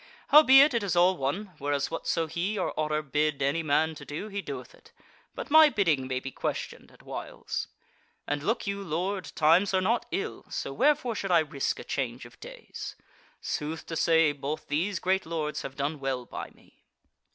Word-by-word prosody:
Howbeit 280 Hz, -1 st, +8 dB
it 235 Hz, -, +1 dB
is 195 Hz, -4 st, -1 dB
all 180 Hz, +2 st, +5 dB
one, 180 Hz, +8 st, -3 dB
whereas 145 Hz, 0 st, -1 dB
whatso 165 Hz, 0 st, -1 dB
he 175 Hz, +7 st, -2 dB
or 185 Hz, -, -1 dB
Otter 155 Hz, 0 st, -1 dB
bid 150 Hz, +1 st, 0 dB
any 140 Hz, +4 st, +1 dB
man 160 Hz, +1 st, +2 dB
to 155 Hz, -, -10 dB
do, 155 Hz, +9 st, -6 dB
he 200 Hz, -1 st, -3 dB
doeth -, -, -7 dB
it, -, -, -20 dB, 0.4 s
but -, -, -6 dB
my 315 Hz, 0 st, +8 dB
bidding 160 Hz, -, +1 dB
may 130 Hz, -1 st, -1 dB
be 135 Hz, +1 st, -7 dB
questioned -, -, -4 dB
at -, -, -20 dB
whiles. -, -, -5 dB, 0.6 s
And 145 Hz, 0 st, -2 dB
look 225 Hz, -, -1 dB
you, 200 Hz, 0 st, -3 dB
lord, 185 Hz, +3 st, -2 dB
times 170 Hz, +6 st, +4 dB
are -, -, +4 dB
not 225 Hz, +6 st, 0 dB
ill, 195 Hz, -, -4 dB
so 135 Hz, -, -4 dB
wherefore 280 Hz, -, +2 dB
should 200 Hz, -2 st, -4 dB
I 175 Hz, -, +5 dB
risk 145 Hz, -3 st, -2 dB
a -, -, -7 dB
change -, -, -3 dB
of -, -, -15 dB
days? -, -, -9 dB, 0.5 s
Sooth 155 Hz, +2 st, -4 dB
to 165 Hz, -, -5 dB
say, 165 Hz, -1 st, +4 dB
both 145 Hz, +2 st, -5 dB
these 170 Hz, +7 st, 0 dB
great 190 Hz, +1 st, 0 dB
lords 155 Hz, -2 st, -2 dB
have 135 Hz, -, -7 dB
done 145 Hz, +2 st, -2 dB
well 135 Hz, -2 st, -2 dB
by -, -, -7 dB
me." -, -, -25 dB
165 Hz, 190 wpm, -28 LUFS, 145-200 Hz, 0.6 s, Howbeit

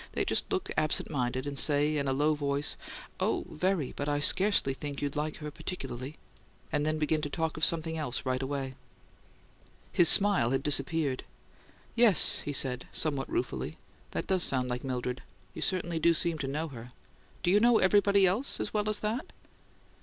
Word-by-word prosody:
They -, -, -1 dB
just -, -, -2 dB
look 380 Hz, -2 st, -2 dB
absent 155 Hz, +1 st, -1 dB
minded 130 Hz, -1 st, -2 dB
and 140 Hz, -1 st, -2 dB
say 150 Hz, +1 st, +3 dB
in 140 Hz, -1 st, -1 dB
a -, -, +1 dB
low 145 Hz, +3 st, +2 dB
voice, 145 Hz, -1 st, -1 dB, 0.4 s
'Oh, -, -, -1 dB
very; 180 Hz, -4 st, -1 dB
but 145 Hz, +1 st, -3 dB
I 145 Hz, -, 0 dB
scarcely 185 Hz, -2 st, +3 dB
think 140 Hz, +1 st, -6 dB
you'd 145 Hz, 0 st, -3 dB
like 150 Hz, +1 st, -3 dB
her 150 Hz, -1 st, -7 dB
particularly'; 135 Hz, -4 st, -7 dB, 0.5 s
and 150 Hz, -1 st, 0 dB
then 155 Hz, 0 st, 0 dB
begin 155 Hz, 0 st, 0 dB
to 145 Hz, -, -3 dB
talk 160 Hz, +1 st, -2 dB
of 155 Hz, -, -5 dB
something 160 Hz, -1 st, +1 dB
else 135 Hz, -5 st, -4 dB
right 130 Hz, 0 st, -1 dB
away." 135 Hz, -1 st, -4 dB, 1.2 s
His 170 Hz, -, +6 dB
smile 200 Hz, -, +6 dB
had 135 Hz, +1 st, -1 dB
disappeared. 145 Hz, -1 st, +1 dB, 0.7 s
"Yes," 230 Hz, -7 st, +5 dB
he 145 Hz, -, -5 dB
said, 130 Hz, -3 st, 0 dB
somewhat 145 Hz, -4 st, -1 dB
ruefully. 345 Hz, +2 st, -3 dB, 0.3 s
"That -, -, -4 dB
does 190 Hz, -1 st, +1 dB
sound 125 Hz, -5 st, +1 dB
like 125 Hz, 0 st, -4 dB
Mildred. 125 Hz, -1 st, -4 dB, 0.3 s
You -, -, -8 dB
certainly 175 Hz, -3 st, -1 dB
do 170 Hz, +1 st, +3 dB
seem 165 Hz, 0 st, 0 dB
to 140 Hz, -, -3 dB
know 155 Hz, +4 st, -3 dB
her! 125 Hz, -2 st, -11 dB, 0.5 s
Do 175 Hz, -, +2 dB
you 205 Hz, -, +5 dB
know 235 Hz, +1 st, +4 dB
everybody 200 Hz, 0 st, +4 dB
as 205 Hz, +10 st, 0 dB
well 210 Hz, 0 st, 0 dB
as 215 Hz, -, -1 dB
that?" 220 Hz, +6 st, -3 dB
150 Hz, 180 wpm, -29 LUFS, 135-180 Hz, 1.2 s, His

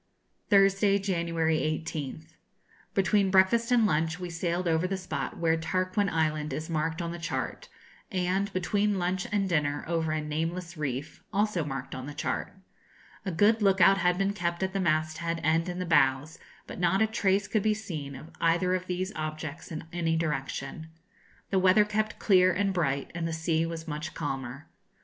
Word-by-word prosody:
Thursday, 195 Hz, 0 st, +5 dB
January 170 Hz, -4 st, 0 dB
18th. 155 Hz, 0 st, -4 dB, 0.6 s
Between 195 Hz, 0 st, +3 dB
breakfast 200 Hz, +6 st, +4 dB
and 240 Hz, -3 st, +5 dB
lunch 160 Hz, -1 st, +1 dB
we 180 Hz, -1 st, -5 dB
sailed 170 Hz, +1 st, -1 dB
over 165 Hz, +2 st, +2 dB
the 195 Hz, +1 st, -2 dB
spot 185 Hz, 0 st, -4 dB
where 165 Hz, -1 st, +2 dB
Tarquin 185 Hz, +4 st, 0 dB
Island 155 Hz, -2 st, 0 dB
is 155 Hz, +4 st, -4 dB
marked 160 Hz, +2 st, -1 dB
on 170 Hz, -, -3 dB
the 175 Hz, -, -6 dB
chart, 325 Hz, -, -4 dB, 0.4 s
and, 190 Hz, +2 st, 0 dB
between 200 Hz, +3 st, +1 dB
lunch 180 Hz, 0 st, -1 dB
and 200 Hz, -2 st, +1 dB
dinner, 145 Hz, -4 st, 0 dB
over 165 Hz, -1 st, 0 dB
a 155 Hz, -, 0 dB
nameless 165 Hz, +4 st, -3 dB
reef, 145 Hz, -2 st, -4 dB
also 205 Hz, -4 st, +1 dB
marked 135 Hz, -2 st, -5 dB
on 130 Hz, +1 st, -6 dB
the 145 Hz, -, -7 dB
chart. 155 Hz, -, -3 dB, 0.7 s
A -, -, 0 dB
good 210 Hz, +6 st, +3 dB
look 195 Hz, -2 st, +3 dB
out 195 Hz, +3 st, +6 dB
had 180 Hz, 0 st, +2 dB
been 195 Hz, +1 st, +1 dB
kept 175 Hz, -2 st, -2 dB
at 190 Hz, 0 st, -1 dB
the 195 Hz, -, -1 dB
masthead 165 Hz, 0 st, 0 dB
and 165 Hz, +3 st, +2 dB
in 175 Hz, -, -4 dB
the 180 Hz, -, -2 dB
bows, 145 Hz, -2 st, +2 dB, 0.3 s
but -, -, -8 dB
not 180 Hz, +4 st, +3 dB
a -, -, +5 dB
trace 205 Hz, -2 st, +1 dB
could 215 Hz, -, +1 dB
be 215 Hz, +1 st, +2 dB
seen 155 Hz, -10 st, -6 dB
of 145 Hz, +5 st, -11 dB
either 170 Hz, +2 st, +2 dB
of 185 Hz, 0 st, -2 dB
these 185 Hz, +2 st, -2 dB
objects 155 Hz, 0 st, -5 dB
in 160 Hz, 0 st, -5 dB
any 165 Hz, -2 st, 0 dB
direction. 150 Hz, 0 st, -3 dB, 0.6 s
The 195 Hz, -, +3 dB
weather 190 Hz, +3 st, +5 dB
kept 215 Hz, +1 st, -1 dB
clear 185 Hz, -3 st, +5 dB
and 195 Hz, +1 st, 0 dB
bright, 140 Hz, -6 st, -1 dB
and 170 Hz, -1 st, -2 dB
the 165 Hz, -, -3 dB
sea 160 Hz, 0 st, 0 dB
was 165 Hz, 0 st, -6 dB
much 150 Hz, +1 st, -5 dB
calmer. 135 Hz, -2 st, -4 dB
170 Hz, 180 wpm, -28 LUFS, 160-190 Hz, 0.7 s, out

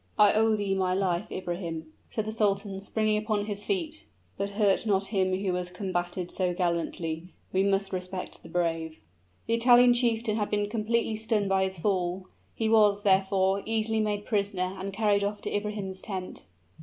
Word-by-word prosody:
"I 210 Hz, -1 st, +6 dB
owe 220 Hz, 0 st, +3 dB
thee 205 Hz, -2 st, -1 dB
my 185 Hz, -1 st, +1 dB
life, 185 Hz, 0 st, -1 dB
Ibrahim," 170 Hz, -3 st, -5 dB, 0.2 s
said 220 Hz, -, -2 dB
the 215 Hz, -, -3 dB
sultan, 200 Hz, -2 st, 0 dB
springing 215 Hz, +1 st, 0 dB
upon 215 Hz, -1 st, -1 dB
his 205 Hz, -1 st, -4 dB
feet. 330 Hz, -6 st, -2 dB, 0.3 s
"But 200 Hz, 0 st, -2 dB
hurt 205 Hz, 0 st, +3 dB
not 195 Hz, -1 st, +2 dB
him 185 Hz, -1 st, +2 dB
who 190 Hz, -2 st, 0 dB
has 180 Hz, 0 st, -2 dB
combated 180 Hz, -1 st, -3 dB
so 180 Hz, -2 st, 0 dB
gallantly: 170 Hz, -2 st, -2 dB, 0.3 s
we 190 Hz, -, +3 dB
must 195 Hz, 0 st, +1 dB
respect 185 Hz, 0 st, -5 dB
the -, -, -13 dB
brave!" 165 Hz, -2 st, -1 dB, 0.5 s
The 230 Hz, -, 0 dB
Italian 245 Hz, +1 st, +6 dB
chieftain 230 Hz, -3 st, +1 dB
had 210 Hz, -2 st, -1 dB
been 205 Hz, 0 st, -1 dB
completely 225 Hz, 0 st, 0 dB
stunned 220 Hz, -2 st, 0 dB
by 190 Hz, 0 st, +3 dB
his 190 Hz, -1 st, -4 dB
fall; 185 Hz, 0 st, -1 dB, 0.3 s
he 225 Hz, -, 0 dB
was, 210 Hz, -2 st, +4 dB
therefore, 190 Hz, 0 st, +3 dB
easily 220 Hz, 0 st, 0 dB
made 210 Hz, -1 st, -1 dB
prisoner 200 Hz, -4 st, -1 dB
and 195 Hz, +1 st, -4 dB
carried 205 Hz, 0 st, +2 dB
off 205 Hz, +1 st, -2 dB
to -, -, -3 dB
Ibrahim's 205 Hz, -2 st, -3 dB
tent. 190 Hz, -3 st, -6 dB
200 Hz, 175 wpm, -28 LUFS, 185-215 Hz, 0.5 s, I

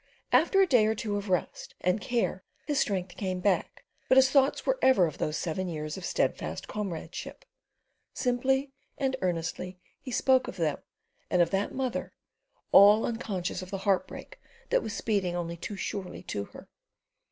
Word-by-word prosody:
After 390 Hz, -, +4 dB
a 390 Hz, -, +7 dB
day 245 Hz, -, +4 dB
or 220 Hz, -, +1 dB
two 210 Hz, -1 st, -3 dB
of 205 Hz, 0 st, -4 dB
rest 180 Hz, -2 st, -2 dB
and 180 Hz, +4 st, +1 dB
care 230 Hz, -4 st, -1 dB, 0.2 s
his 295 Hz, -2 st, 0 dB
strength 185 Hz, -5 st, -1 dB
came 185 Hz, -2 st, -2 dB
back, 185 Hz, +1 st, 0 dB, 0.2 s
but -, -, +6 dB
his 265 Hz, 0 st, +6 dB
thoughts 275 Hz, 0 st, +3 dB
were -, -, +1 dB
ever 260 Hz, -9 st, +5 dB
of 155 Hz, -, -5 dB
those 155 Hz, +1 st, -1 dB
seven 180 Hz, +3 st, -2 dB
years 155 Hz, -2 st, -4 dB
of 190 Hz, -, -8 dB
steadfast -, -, -1 dB
comradeship. 195 Hz, -, -6 dB, 0.7 s
Simply 265 Hz, +2 st, 0 dB, 0.3 s
and 265 Hz, -2 st, 0 dB
earnestly 180 Hz, +1 st, -2 dB, 0.2 s
he -, -, -9 dB
spoke 260 Hz, +1 st, +3 dB
of 185 Hz, -, -7 dB
them 155 Hz, -4 st, 0 dB, 0.5 s
and 180 Hz, -, +2 dB
of 175 Hz, -, +3 dB
that 195 Hz, +1 st, -1 dB
mother, 260 Hz, -2 st, -2 dB, 0.6 s
all 205 Hz, +2 st, +8 dB
unconscious 200 Hz, -7 st, -3 dB
of 185 Hz, -, -8 dB
the 195 Hz, -, -3 dB
heartbreak 205 Hz, -, -1 dB, 0.3 s
that -, -, +4 dB
was 215 Hz, -, -5 dB
speeding 195 Hz, -5 st, 0 dB
only 170 Hz, -1 st, -3 dB
too 185 Hz, +4 st, -6 dB
surely 190 Hz, -1 st, -5 dB
to 100 Hz, 0 st, -4 dB
her. -, -, -13 dB
200 Hz, 170 wpm, -29 LUFS, 180-255 Hz, 0.7 s, all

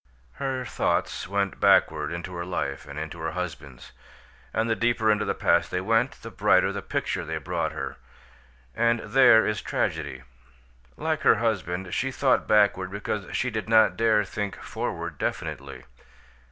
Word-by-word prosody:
Her 130 Hz, -2 st, -2 dB
thoughts -, -, -1 dB
went 100 Hz, 0 st, -1 dB
backward -, -, +3 dB
into 85 Hz, +2 st, -5 dB
her 85 Hz, 0 st, -4 dB
life 70 Hz, -7 st, -4 dB
and 70 Hz, +1 st, -9 dB
into 80 Hz, +2 st, -6 dB
her 80 Hz, 0 st, -3 dB
husband's; 80 Hz, -8 st, -6 dB, 0.6 s
and 110 Hz, +1 st, 0 dB
the 115 Hz, -, +1 dB
deeper 115 Hz, -2 st, +2 dB
into 105 Hz, 0 st, +1 dB
the -, -, -1 dB
past -, -, +2 dB
they 90 Hz, -, -1 dB
went, 115 Hz, +6 st, 0 dB
the 115 Hz, -, -7 dB
brighter 95 Hz, -1 st, +3 dB
the 100 Hz, 0 st, -4 dB
pictures -, -, -3 dB
they 80 Hz, 0 st, -2 dB
brought 85 Hz, -1 st, -2 dB
her 70 Hz, -3 st, -5 dB, 0.8 s
and 115 Hz, 0 st, +2 dB
there 115 Hz, 0 st, +5 dB
is 105 Hz, 0 st, -1 dB
tragedy. -, -, -2 dB, 0.7 s
Like 155 Hz, 0 st, -1 dB
her -, -, +5 dB
husband, 95 Hz, -5 st, -2 dB
she 135 Hz, +5 st, 0 dB
thought 130 Hz, 0 st, +1 dB
backward 100 Hz, -3 st, +3 dB
because 100 Hz, 0 st, -4 dB
she 125 Hz, -, -1 dB
did 110 Hz, -1 st, -4 dB
not 110 Hz, -1 st, +5 dB
dare 110 Hz, -2 st, +3 dB
think 100 Hz, 0 st, -4 dB
forward -, -, -4 dB
definitely. 70 Hz, -2 st, -4 dB
100 Hz, 160 wpm, -26 LUFS, 90-115 Hz, 0.8 s, there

